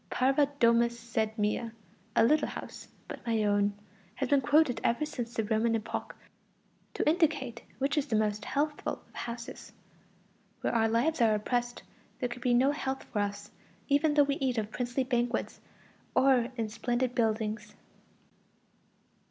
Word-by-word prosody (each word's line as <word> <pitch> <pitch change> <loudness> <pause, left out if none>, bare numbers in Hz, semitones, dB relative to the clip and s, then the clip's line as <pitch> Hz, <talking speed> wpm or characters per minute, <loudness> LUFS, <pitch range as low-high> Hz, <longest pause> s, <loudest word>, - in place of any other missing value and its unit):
Parva 270 +3 +3
domus 235 0 +3
sed 225 -1 -2
mea 215 +2 0 0.5
(a 230 - +5
little 300 +7 +3
house, - - -8 0.2
but - - -8
my 225 -2 +1
own), 205 0 +2 0.4
has 270 - -1
been 280 -1 +4
quoted 285 0 +3
ever 240 +6 +1
since 240 -5 -5
the 225 - 0
Roman 225 +2 +1
epoch 225 0 -4 0.8
to - - -1
indicate 300 -7 +1 0.2
which 280 +3 +1
is 290 - -3
the 225 - 0
most 210 -1 0
healthful 295 +1 -2
of - - -27
houses. 235 0 -7 0.9
Where - - 0
our 225 -1 +3
lives 245 +6 +1
are 220 -2 +5
oppressed, 240 +3 -2 0.4
there 250 - -1
can 245 +1 -7
be 245 -1 +3
no 265 +3 +4
health 270 -2 -3
for 210 - -4
us, 205 0 -3 0.4
even 295 +2 +3
though 290 - +7
we 280 0 -1
eat 255 -3 -1
of 215 -1 -2
princely 245 +2 -1
banquets 245 -1 -1 0.5
or 255 -2 +4
in 225 -1 -1
splendid 240 +3 -1
buildings. 215 -2 -1
240 Hz, 155 wpm, -30 LUFS, 225-270 Hz, 0.9 s, though